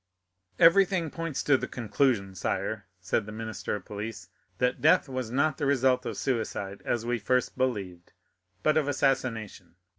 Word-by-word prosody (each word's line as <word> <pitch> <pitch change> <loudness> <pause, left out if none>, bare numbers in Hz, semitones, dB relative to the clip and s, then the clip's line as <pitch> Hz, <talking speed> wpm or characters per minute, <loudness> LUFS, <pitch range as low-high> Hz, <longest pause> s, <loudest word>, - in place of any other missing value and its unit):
"Everything 175 -2 +5
points 165 -4 -3
to 145 -2 +4
the - - -3
conclusion, 115 -4 0
sire," 100 +2 -3
said 100 +4 -1
the - - -6
minister 110 0 -4
of 100 - -8
police, 105 -3 -6 0.3
"that 125 +3 0
death 160 +2 +5
was 130 -3 -4
not 140 +4 +1
the 145 - 0
result 130 -2 +2
of - - -4
suicide, 105 -6 -2
as 115 -1 -1
we 120 0 0
first 125 +4 0
believed, 100 -9 -2 0.5
but 155 0 +3
of 150 -2 +2
assassination. 125 -10 -1
120 Hz, 155 wpm, -28 LUFS, 105-140 Hz, 0.5 s, Everything